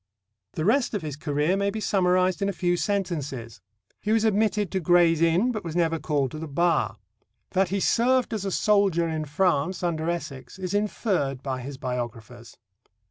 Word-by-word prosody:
The 155 - -2
rest 235 +2 +2
of 200 - -3
his 150 -3 -4
career 150 +3 0
may 200 0 0
be 220 +2 -4
summarized 185 -2 +2
in 200 - +1
a - - -2
few 175 0 0
sentences. 150 - -3 0.4
He 215 - -1
was 225 0 +3
admitted 210 -2 +1
to 190 - 0
Gray's 170 -1 +4
Inn, 170 +9 +3
but 215 -3 -4
was 165 -1 -6
never 165 -2 +1
called 140 -5 -1
to 155 - -7
the 160 - -5
Bar. 150 - +1 0.5
That 190 -1 +2
he 200 +2 -1
served 245 +4 +2
as 215 -3 -2
a 195 - -1
soldier 195 -4 +2
in 160 -1 -3
France 170 +2 0
under 165 -1 -1
Essex 150 -4 -5
is 185 0 -4
inferred 195 - -1
by 130 -2 -3
his 135 +2 -7
biographers. 120 -2 -6
175 Hz, 185 wpm, -25 LUFS, 145-200 Hz, 0.5 s, Gray's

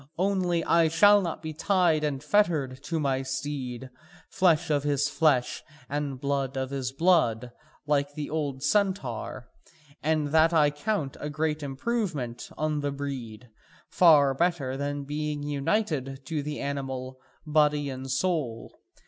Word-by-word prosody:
Only 180 -2 +1
I 170 -1 +4
shall 205 +6 +6
not 170 -3 -4
be 160 0 -4
tied 170 -2 +2
and 145 -2 -2
fettered 150 -8 +1
to 165 0 -2
my 135 -3 0
steed, 130 -2 -5 0.4
flesh 165 -4 +2
of 145 -1 +2
his 145 0 +1
flesh, 145 -7 +1 0.3
and 140 -2 -3
blood 140 -1 -1
of 130 0 -3
his 130 -2 -3
blood, 135 -7 +2 0.3
like 145 -1 0
the 150 -1 -4
old 145 -4 -3
centaur. 145 - -1 0.5
And 155 -1 0
that 160 +2 +4
I 150 -2 +4
count 150 -2 -2
a 150 - -4
great 150 +1 -1
improvement 140 - -3
on 155 -1 -1
the 145 0 -1
breed, 125 -5 -6 0.4
far 150 -6 +5
better 145 -4 0
than 145 +1 -3
being 150 +1 -3
united 145 - -1
to 155 -2 -2
the 150 +1 -5
animal, 130 -2 -4 0.3
body 150 -1 +2
and 130 0 -7
soul. 130 -5 -1
145 Hz, 140 wpm, -27 LUFS, 135-160 Hz, 0.5 s, shall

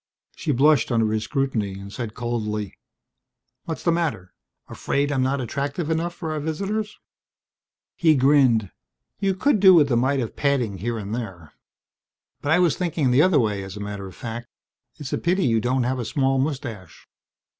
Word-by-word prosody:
She - - -2
blushed 140 -1 +3
under 115 -2 +2
his 110 0 -1
scrutiny, 105 -9 -2
said 115 -1 -6
coldly, 105 -4 -3 0.9
"What's 160 - -5
the 170 - +3
matter? 155 - -2 0.3
Afraid 145 +1 -1
I'm 135 -2 +1
not 135 +2 0
attractive 140 +6 -3
enough 170 +2 -1
for 160 -2 -5
our 155 - -2
visitors?" 200 +8 -3 1.0
He 160 -3 +4
grinned. 130 -7 +3 0.5
"You 195 -1 +1
could 255 +3 +2
do 190 -1 +8
with 145 -4 +4
a - - +3
mite 135 +4 +2
of 115 -4 -4
padding 125 -9 0
here 115 +4 -2
and 105 0 -5
there. 95 -10 -6 0.9
But 145 - -1
I 160 - +5
was 175 -4 +3
thinking 165 -7 0
the 130 +4 +5
other 180 -3 +4
way, 105 -4 0
as 95 +1 -8
a - - -7
matter 100 -1 -5
of 95 - -12
fact. 120 +1 -6 0.5
It's 145 -3 -7
a - - 0
pity 180 +2 +1
you 115 -2 +2
don't 125 +2 +1
have 130 +1 -1
a - - -2
small 135 +1 +1
mustache." 130 - -5
130 Hz, 175 wpm, -23 LUFS, 110-155 Hz, 1.0 s, do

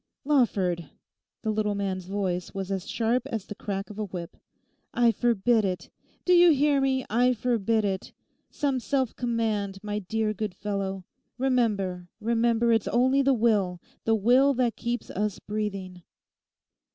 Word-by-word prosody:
'Lawford!' 190 - +1 0.5
the 220 - 0
little 210 -1 0
man's 190 -2 -2
voice 185 -3 -2
was 195 0 -4
as 190 -1 -3
sharp 235 +2 +1
as 225 -7 -4
the - - -7
crack 200 0 -5
of 210 - -9
a 215 - -1
whip; 175 -3 -7 0.6
'I 240 -1 +5
forbid 230 -1 +2
it. 185 -2 -3 0.3
Do 360 - +4
you 350 0 +7
hear 290 -2 +3
me? 265 -1 +1
I 245 +3 +3
forbid 225 -2 +1
it. 190 -1 -3 0.4
Some 275 -3 -1
self 260 0 -1
command; 220 -5 -1
my 210 0 -2
dear 215 +2 -1
good 210 -2 -4
fellow, 195 -2 -3 0.3
remember, 210 -9 0
remember 235 +1 +2
it's 225 -2 +2
only 260 +3 +3
the 270 -1 +3
will, 205 -6 +1 0.3
the 225 - +3
will 255 +6 +4
that 240 -2 +1
keeps 240 0 -3
us 210 0 -1
breathing. 195 -4 -4
220 Hz, 150 wpm, -27 LUFS, 195-245 Hz, 0.6 s, you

